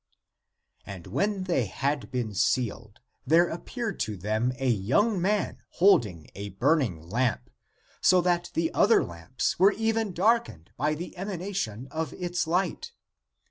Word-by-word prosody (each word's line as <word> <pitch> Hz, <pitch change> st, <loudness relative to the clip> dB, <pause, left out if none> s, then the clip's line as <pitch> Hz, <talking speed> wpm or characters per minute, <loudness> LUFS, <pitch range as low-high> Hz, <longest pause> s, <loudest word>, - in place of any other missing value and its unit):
And 95 Hz, -4 st, -9 dB
when 200 Hz, -2 st, -1 dB
they 170 Hz, -10 st, +1 dB
had 140 Hz, +8 st, -2 dB
been 120 Hz, -4 st, -3 dB
sealed, 110 Hz, +1 st, -1 dB, 0.2 s
there 165 Hz, +5 st, +4 dB
appeared 220 Hz, +7 st, -5 dB
to 105 Hz, -2 st, -2 dB
them 110 Hz, +6 st, 0 dB
a 135 Hz, -, -1 dB
young 135 Hz, -, +2 dB
man 205 Hz, +3 st, 0 dB
holding 110 Hz, -, +3 dB
a 100 Hz, +1 st, -6 dB
burning 105 Hz, -, 0 dB
lamp, 120 Hz, +4 st, -1 dB, 0.5 s
so 185 Hz, -, +5 dB
that 175 Hz, 0 st, 0 dB
the 165 Hz, 0 st, 0 dB
(other) 215 Hz, +3 st, +4 dB
lamps 85 Hz, -, -3 dB
were 195 Hz, +2 st, +6 dB
even 225 Hz, -1 st, 0 dB
darkened 190 Hz, -, 0 dB
by 150 Hz, +3 st, 0 dB
the 170 Hz, +4 st, -7 dB
emanation 185 Hz, -, -4 dB
of 160 Hz, -3 st, -3 dB
its 175 Hz, -1 st, -2 dB
light. 175 Hz, +1 st, -1 dB
155 Hz, 140 wpm, -27 LUFS, -, 0.5 s, were